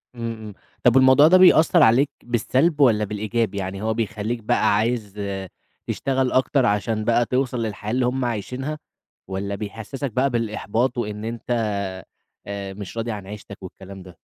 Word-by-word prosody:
إمم، 115 Hz, -1 st, -4 dB
إمم، 110 Hz, -2 st, -9 dB, 0.3 s
طَب 125 Hz, 0 st, +5 dB
والموضوع 130 Hz, +3 st, +7 dB
ده 185 Hz, +3 st, +7 dB
بيأثّر 175 Hz, -2 st, +6 dB
عليك 125 Hz, +6 st, +4 dB
بالسلب 130 Hz, +7 st, +1 dB
والّا 115 Hz, -6 st, +4 dB
بالإيجاب؟ 105 Hz, +2 st, -2 dB
يعني 95 Hz, 0 st, -4 dB
هو 110 Hz, +1 st, 0 dB
بيخلّيك 110 Hz, +1 st, -3 dB
بقى 110 Hz, -1 st, +2 dB
عايز 110 Hz, -1 st, -1 dB, 0.7 s
تشتغل 130 Hz, -1 st, 0 dB
أكتر 130 Hz, 0 st, +2 dB
عشان 110 Hz, 0 st, 0 dB
بقى 120 Hz, +1 st, +3 dB
توصَل 130 Hz, +1 st, -1 dB
للحياة 105 Hz, -1 st, -4 dB
اللي 125 Hz, 0 st, +1 dB
هُم 125 Hz, +1 st, -1 dB
عايشينها؟ 125 Hz, +7 st, -3 dB, 0.5 s
والّا 100 Hz, +1 st, -3 dB
بيحسّسك 115 Hz, +6 st, -5 dB
بقى 130 Hz, +5 st, +1 dB
بالإحباط 115 Hz, +1 st, -1 dB
وإن 105 Hz, -2 st, -4 dB
أنت 115 Hz, 0 st, -5 dB, 1.0 s
آآ 100 Hz, -1 st, -5 dB
مش 100 Hz, +2 st, -9 dB
راضي 115 Hz, +1 st, -2 dB
عن 100 Hz, -3 st, -7 dB
عيشتك 100 Hz, -1 st, -10 dB
والكلام 95 Hz, +1 st, -10 dB
ده؟ 90 Hz, -2 st, -14 dB
115 Hz, 155 wpm, -22 LUFS, 105-130 Hz, 1.0 s, والموضوع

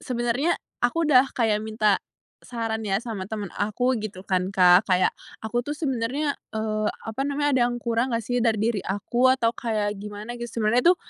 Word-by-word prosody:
sebenarnya 245 Hz, +6 st, 0 dB, 0.2 s
aku 285 Hz, +8 st, +1 dB
udah 270 Hz, -3 st, +5 dB
kayak 220 Hz, -3 st, +2 dB
minta 215 Hz, -3 st, +1 dB, 0.4 s
saran 225 Hz, -2 st, -3 dB
ya, 195 Hz, -1 st, +1 dB
sama 220 Hz, -6 st, -5 dB
temen 210 Hz, -4 st, -4 dB
aku 245 Hz, +5 st, 0 dB
gitu 200 Hz, -3 st, -7 dB
kan 185 Hz, -1 st, 0 dB
Kak, 180 Hz, 0 st, +6 dB
kayak 185 Hz, -1 st, +3 dB, 0.3 s
"Aku 240 Hz, +2 st, 0 dB
tuh 295 Hz, -, -3 dB
sebenarnya, 275 Hz, 0 st, -1 dB, 0.2 s
eee, 215 Hz, -1 st, -1 dB, 0.2 s
apa 225 Hz, +5 st, -2 dB
namanya 290 Hz, 0 st, 0 dB
ada -, -, +3 dB
yang 240 Hz, -, -3 dB
kurang 235 Hz, +2 st, 0 dB
nggak 230 Hz, -, -1 dB
sih 245 Hz, +3 st, -1 dB
dari 225 Hz, -2 st, +3 dB
diri 220 Hz, -1 st, +1 dB
aku, 235 Hz, +6 st, +1 dB
atau 230 Hz, -3 st, +1 dB
kayak 210 Hz, -3 st, -1 dB
gimana?" 210 Hz, +2 st, -7 dB
Gitu, 240 Hz, -, -4 dB
sebenernya 245 Hz, +11 st, +4 dB
tuh, -, -, -34 dB
225 Hz, 185 wpm, -25 LUFS, 210-250 Hz, 0.4 s, Kak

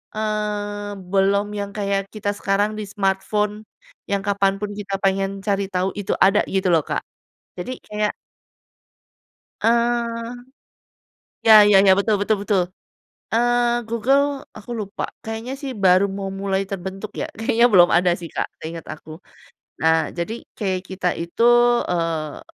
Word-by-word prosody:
eee, 210 Hz, -1 st, -2 dB, 0.2 s
belum 200 Hz, +1 st, +3 dB
yang 200 Hz, 0 st, -4 dB
kayak 200 Hz, -1 st, 0 dB, 0.2 s
kita 205 Hz, -1 st, -2 dB
sekarang 205 Hz, +2 st, +1 dB
di -, -, -3 dB
smartphone, 205 Hz, +1 st, 0 dB, 0.6 s
yang 200 Hz, -1 st, +1 dB
kapan 195 Hz, -1 st, +2 dB
pun 210 Hz, -1 st, -3 dB
kita 200 Hz, -1 st, -6 dB
pengen 195 Hz, 0 st, +2 dB, 0.2 s
cari 200 Hz, 0 st, +1 dB
tahu 180 Hz, +1 st, +1 dB
itu 200 Hz, -, -3 dB
ada 200 Hz, +2 st, +4 dB, 0.2 s
gitu 190 Hz, -1 st, +1 dB
loh 160 Hz, -, +4 dB
Kak. -, -, -1 dB, 0.6 s
Jadi 180 Hz, +8 st, -5 dB, 0.2 s
kayak 210 Hz, 0 st, -1 dB, 1.5 s
eee. 235 Hz, 0 st, +1 dB, 1.2 s
Ya 215 Hz, -1 st, +10 dB
ya 205 Hz, -1 st, +6 dB
ya, 190 Hz, -, +8 dB
betul 205 Hz, 0 st, +2 dB
betul 215 Hz, +1 st, +2 dB
betul, 200 Hz, -3 st, +2 dB, 0.7 s
eee, 240 Hz, 0 st, +2 dB
Google, 270 Hz, +5 st, +1 dB, 0.2 s
aku 215 Hz, +3 st, -12 dB
lupa, 200 Hz, +1 st, -5 dB, 0.2 s
kayaknya 225 Hz, +4 st, -5 dB
sih 275 Hz, -1 st, -6 dB
baru 185 Hz, +2 st, +6 dB
mau 195 Hz, 0 st, -4 dB
mulai 195 Hz, 0 st, -1 dB
terbentuk 195 Hz, +2 st, -6 dB
ya, -, -, -1 dB
kayaknya 235 Hz, +1 st, +3 dB
belum 175 Hz, -2 st, +7 dB
ada 175 Hz, 0 st, +4 dB
sih 170 Hz, -, -6 dB
Kak -, -, -3 dB
seingat 165 Hz, 0 st, -6 dB
aku. 155 Hz, -, -15 dB, 0.7 s
Nah, 160 Hz, 0 st, +3 dB
jadi 215 Hz, +7 st, -4 dB
kayak 190 Hz, -4 st, -1 dB
kita 190 Hz, -1 st, -1 dB
itu, 170 Hz, +7 st, -1 dB, 0.4 s
eee, 165 Hz, -4 st, -2 dB
200 Hz, 140 wpm, -22 LUFS, 190-220 Hz, 1.5 s, Ya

